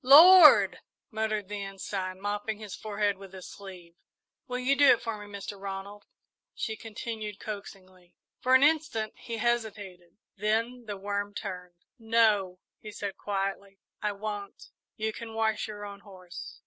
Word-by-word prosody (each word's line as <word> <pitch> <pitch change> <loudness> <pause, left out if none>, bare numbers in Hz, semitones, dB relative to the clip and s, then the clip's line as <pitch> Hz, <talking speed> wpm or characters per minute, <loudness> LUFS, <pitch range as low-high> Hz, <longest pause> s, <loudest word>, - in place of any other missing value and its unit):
"Lord!" 320 +5 +9 0.3
muttered 215 -2 -1
the 205 0 -5
Ensign, 190 -1 -5
mopping 205 +1 -2
his 210 -3 -8
forehead 205 -2 -1
with 195 -1 -12
his 185 -1 -9
sleeve. 185 -4 -11 0.5
"Will 250 -1 -3
you 255 +2 +2
do 285 0 +6
it 245 - +7
for 230 -1 -2
me, 205 - -12
Mr. 200 0 -7
Ronald?" 200 +1 -7 0.5
she 220 - -3
continued 215 -1 -6
coaxingly. 185 -4 -9 0.2
For 255 +1 +4
an 260 - +6
instant 295 -8 +2
he 230 -1 -6
hesitated, 205 -7 -2 0.2
then 230 +4 -1
the 205 -1 -4
worm 205 +1 -3
turned. 180 -2 -6 0.2
"No," 220 -5 +3 0.2
he 215 - -9
said 200 -2 -5
quietly, 195 0 -3 0.2
"I 210 -1 0
won't. 205 0 -6 0.2
You 220 0 -2
can 225 0 -8
wash 220 -1 0
your 205 -1 -7
own 200 0 -8
horse." 185 -3 -10
205 Hz, 150 wpm, -29 LUFS, 195-225 Hz, 0.5 s, Lord